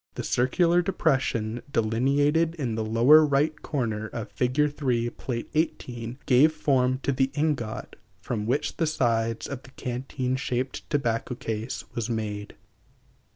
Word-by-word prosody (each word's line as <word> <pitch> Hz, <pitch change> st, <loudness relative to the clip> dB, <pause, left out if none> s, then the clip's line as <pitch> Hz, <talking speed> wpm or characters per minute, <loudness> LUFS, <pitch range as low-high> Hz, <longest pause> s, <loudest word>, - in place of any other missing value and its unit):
The -, -, -4 dB
circular 170 Hz, +8 st, +3 dB
depression, 130 Hz, -, 0 dB
delineated 140 Hz, +8 st, +2 dB
in 130 Hz, -8 st, -2 dB
the 110 Hz, 0 st, -1 dB
lower 120 Hz, +8 st, +6 dB
right 150 Hz, +2 st, +1 dB
corner 110 Hz, -6 st, -2 dB
of 110 Hz, 0 st, -6 dB
Fig. 145 Hz, +4 st, +1 dB
3, 120 Hz, -4 st, 0 dB
Pl. 120 Hz, -2 st, -4 dB
XVIII, 125 Hz, -6 st, -2 dB
gave 140 Hz, +5 st, +5 dB
form 130 Hz, -4 st, +1 dB
to 140 Hz, -, +1 dB
the 135 Hz, 0 st, +1 dB
ingot 145 Hz, -8 st, -2 dB, 0.2 s
from 105 Hz, +1 st, -3 dB
which 135 Hz, +5 st, -1 dB
the 165 Hz, -, +1 dB
sides 115 Hz, -6 st, 0 dB
of 140 Hz, -2 st, -5 dB
the 135 Hz, -, -15 dB
canteen 130 Hz, 0 st, -3 dB
shaped 130 Hz, 0 st, -3 dB
tobacco 125 Hz, -4 st, -1 dB
case 115 Hz, +1 st, -4 dB
(Fig. -, -, -28 dB
6) -, -, -28 dB
was 120 Hz, 0 st, -2 dB
made. 105 Hz, -3 st, -4 dB
125 Hz, 150 wpm, -26 LUFS, 115-145 Hz, 0.2 s, lower